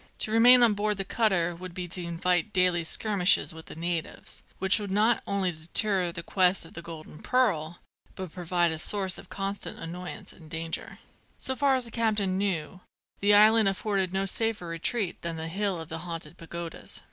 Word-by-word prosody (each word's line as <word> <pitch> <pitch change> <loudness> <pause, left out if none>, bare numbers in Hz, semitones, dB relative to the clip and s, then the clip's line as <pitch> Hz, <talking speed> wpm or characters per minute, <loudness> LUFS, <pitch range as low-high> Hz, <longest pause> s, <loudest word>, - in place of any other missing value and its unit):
To 215 - -1
remain 245 +2 +8
on 230 -3 +6
board 210 0 -1
the 195 - -3
cutter 190 -6 +1
would 180 0 -9
be 180 -1 -4
to 180 +2 -2
invite 175 +3 0
daily 180 -2 +3
skirmishes 190 0 +2
with 160 0 -11
the - - -9
natives, 170 0 -3 0.2
which 190 +3 +3
would 205 -1 -5
not 215 +4 +2
only 195 -2 +1
deter 175 +3 -1
the 170 0 -6
quest 185 0 +2
of - - -14
the 170 - -7
golden 160 -2 -10
pearl, 175 -11 +1 0.4
but 185 -4 -7
prove 180 -1 -9
a 170 -3 +2
source 190 +1 0
of - - -14
constant 195 0 -4
annoyance 175 +2 -7
and 160 -3 -15
danger. 165 0 -4 0.4
So 260 - -2
far 275 -1 +3
as 255 -2 +1
the 230 - -6
captain 210 -5 0
knew, 185 -3 -1 0.4
the 205 +1 +4
island 215 0 +6
afforded 195 -1 -1
no 190 +1 0
safer 220 -1 -1
retreat 170 +4 -2
than 170 -1 -3
the 160 0 -4
hill 195 0 -1
of 160 0 -8
the 160 - -4
Haunted 165 -2 -6
Pagodas. 170 0 -8
185 Hz, 190 wpm, -27 LUFS, 170-205 Hz, 0.4 s, remain